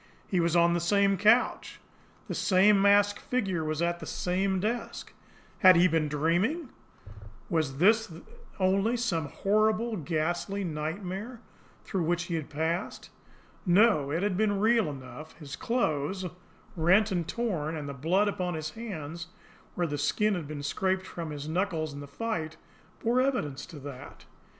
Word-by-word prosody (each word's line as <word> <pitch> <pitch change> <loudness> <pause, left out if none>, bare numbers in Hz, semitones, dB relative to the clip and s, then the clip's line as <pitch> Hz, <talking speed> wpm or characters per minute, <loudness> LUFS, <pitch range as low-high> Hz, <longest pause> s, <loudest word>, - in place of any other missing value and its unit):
He 185 - 0
was 170 0 +1
on 170 0 +4
the 175 - +1
same 200 +3 +3
couch. 215 +6 +2 0.5
The - - -4
same 195 +1 +4
masked 205 0 +4
figure 195 -10 -1
was 155 +1 -1
at 170 0 0
the - - -8
same 190 +1 -1
desk. 225 +5 -4 0.5
Had 185 -1 +8
he 175 +2 +6
been 160 -2 +1
dreaming? 175 - 0 0.8
Was 155 -5 0
this 220 +7 +4
then 165 -1 -12 0.4
only 195 +5 +2
some 180 -11 -1
horrible, 215 +4 +1
ghastly 175 +5 -2
nightmare 185 +8 -4 0.4
through 190 - -2
which 170 +1 0
he 175 0 -5
had 160 -3 -3
passed? 160 +4 -3 0.5
No, 185 -6 +4
it 165 +6 -1
had 205 -2 0
been 205 0 +1
real 220 -3 +3
enough; 140 +3 -10
his 145 -3 -8
clothes, 190 - -1 0.5
rent 190 +6 +3
and 175 -3 -1
torn, 175 -11 -2
and 145 -2 -5
the 140 - -5
blood 175 +10 +1
upon 180 -4 -2
his 155 0 -4
hands, 170 -8 -7 0.5
where 175 - 0
the 145 -3 -3
skin 210 +8 +1
had 170 -6 -4
been 145 -1 -6
scraped 190 +5 -1
from 170 -3 -6
his 145 -1 -6
knuckles 160 -3 -1
in 140 - -8
the 145 - -8
fight, 160 0 -4 0.5
bore 240 +3 +3
evidence 195 - -1
to 160 - -11
that. 140 -2 -10
180 Hz, 160 wpm, -28 LUFS, 155-205 Hz, 0.8 s, Had